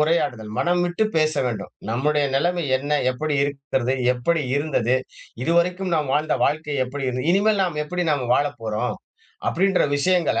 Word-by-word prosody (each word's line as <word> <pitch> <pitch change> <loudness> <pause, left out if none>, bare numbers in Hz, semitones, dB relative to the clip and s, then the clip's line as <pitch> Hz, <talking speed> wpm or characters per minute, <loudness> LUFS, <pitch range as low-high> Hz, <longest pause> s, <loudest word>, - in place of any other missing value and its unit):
உரையாடுதல், 145 -9 0
மனம்விட்டு 175 +4 +1
பேச 155 0 +3
வேண்டும் 115 -5 -4 0.2
நம்முடைய 145 +5 +1
நிலமை 175 +3 +1
என்ன? 140 +3 -6 0.2
எப்படி 150 +3 -2
இருக்கிறது? 135 -2 -1 0.2
எப்படி 150 +6 0
இருந்தது? 135 -5 +1 0.5
இதுவரைக்கும் 175 +3 +1
நாம் 145 -3 -1
வாழ்ந்த 155 +1 +1
வாழ்க்கை 150 -1 -1
எப்படி 135 +1 -5
இருந்தது. 125 +5 -2
இனிமேல் 205 0 +3
நாம 150 -4 -2
எப்படி 180 +3 -2
நாம 130 -4 -1
வாழப்போறோம்? 115 -7 -1 0.5
அப்படீன்ற 190 +2 +2
விஷயங்கள 175 +2 +2
150 Hz, 140 wpm, -23 LUFS, 135-175 Hz, 0.5 s, பேச